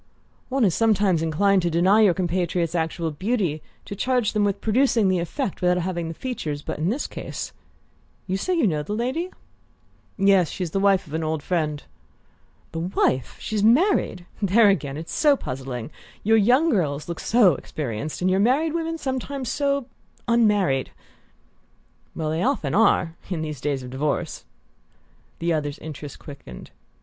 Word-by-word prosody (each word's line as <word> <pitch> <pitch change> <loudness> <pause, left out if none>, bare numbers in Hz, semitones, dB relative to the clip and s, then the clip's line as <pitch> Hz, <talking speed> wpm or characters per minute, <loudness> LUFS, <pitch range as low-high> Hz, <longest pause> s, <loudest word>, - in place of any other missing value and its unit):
"One 265 -2 +2
is 185 - +2
sometimes 205 -6 +2
inclined 190 +5 +2
to 175 - 0
deny 185 +6 +4
your 195 -5 +5
compatriots 175 -2 -1
actual 165 -1 -1
beauty 185 -2 -1 0.2
to 200 - -6
charge 245 0 0
them 210 -1 +2
with 200 -1 0
producing 225 -2 +2
the 185 -1 +2
effect 195 - -3
without 180 0 +3
having 175 -1 -2
the 165 - -6
features; 155 - -4
but - - -5
in 160 +4 +1
this 260 +7 -1
case - - -6 0.7
you 190 - -2
say 360 - -1
you 330 - +2
know 155 -7 +1
the 180 +8 -4
lady?" 260 +10 -2 0.9
"Yes: 195 -4 +4
she's 180 -4 -4
the 195 - 0
wife 195 -1 +3
of 150 - -12
an 160 0 -1
old 155 -1 -2
friend." 155 -5 -1 0.9
"The 165 - -4
wife? 165 -7 0
She's 215 -1 -2
married? 235 - +3 0.2
There, 205 +2 +5
again, 145 -7 0
it's 160 +2 -7
so 295 -2 +4
puzzling! 130 - -5 0.3
Your 225 +2 +4
young 255 +10 +4
girls 150 - 0
look 170 -1 -5
so 215 -7 +4
experienced, 145 +3 -5
and 185 - +3
your 190 - +2
married 280 +9 +2
women 330 0 -2
sometimes 265 -2 -3
so 280 -2 0 0.4
unmarried." 205 - +2 1.3
"Well, 155 -1 -2
they 160 +2 -1
often 235 - 0
are 190 -5 +3 0.2
in 170 -4 -2
these 150 -5 -5
days 140 -3 -1
of 125 - -8
divorce!" 140 +2 -2 0.9
The 170 0 0
other's 145 -2 -2
interest 150 -2 -8
quickened. 135 - -11
185 Hz, 165 wpm, -24 LUFS, 155-225 Hz, 1.3 s, your